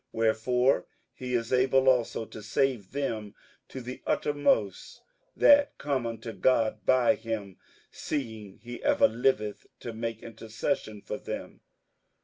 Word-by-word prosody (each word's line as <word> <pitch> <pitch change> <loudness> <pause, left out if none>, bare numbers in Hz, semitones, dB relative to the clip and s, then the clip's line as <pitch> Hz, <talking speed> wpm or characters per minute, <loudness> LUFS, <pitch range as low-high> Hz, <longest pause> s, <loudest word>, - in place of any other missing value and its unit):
58:007:025 - - -5
Wherefore 125 +4 +2 0.3
he 125 -1 -6
is 115 +1 -1
able 130 +1 +3
also 125 -3 +2
to 110 - -10
save 115 -1 0
them 115 -7 -3 0.3
to 130 - -7
the 125 +1 -7
uttermost 145 - 0 0.3
that 285 0 +5
come 135 -4 -1
unto 115 0 -6
God 110 +2 +1
by 130 +1 +5
him, 110 -7 -5 0.3
seeing 110 -9 -5
he 120 +1 -9
ever - - +4
liveth 110 -3 0
to 120 - -6
make 115 0 -4
intercession 110 - -4
for - - -4
them. - - -7
120 Hz, 130 wpm, -28 LUFS, 110-130 Hz, 0.3 s, that